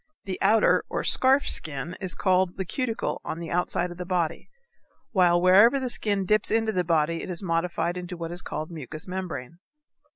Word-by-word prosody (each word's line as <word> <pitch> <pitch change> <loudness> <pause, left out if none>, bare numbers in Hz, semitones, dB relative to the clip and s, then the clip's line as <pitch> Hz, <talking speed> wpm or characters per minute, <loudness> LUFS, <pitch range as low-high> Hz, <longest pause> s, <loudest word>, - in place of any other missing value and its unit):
The 190 -2 -5
outer 215 +2 +3
or - - -3
scarf 265 +2 +3
skin 155 +3 +1
is 185 -3 -1
called 185 -2 +1
the 190 - -3
cuticle 230 +4 -3
on - - -5
the 170 -1 -7
outside 180 0 -1
of 175 - -10
the 180 - -5
body, 175 -3 -2 0.6
while 175 -4 +3
wherever 200 +9 +5
the 260 -1 -3
skin 200 -4 +1
dips 215 +2 +1
into 225 0 +1
the 180 -3 0
body 165 -1 0
it - - -7
is 180 +1 -2
modified 170 0 -1
into 180 0 -7
what 165 0 -6
is 175 +1 -3
called 155 +2 -6
mucous 155 0 -7
membrane. 170 -5 -6
180 Hz, 190 wpm, -25 LUFS, 170-195 Hz, 0.6 s, wherever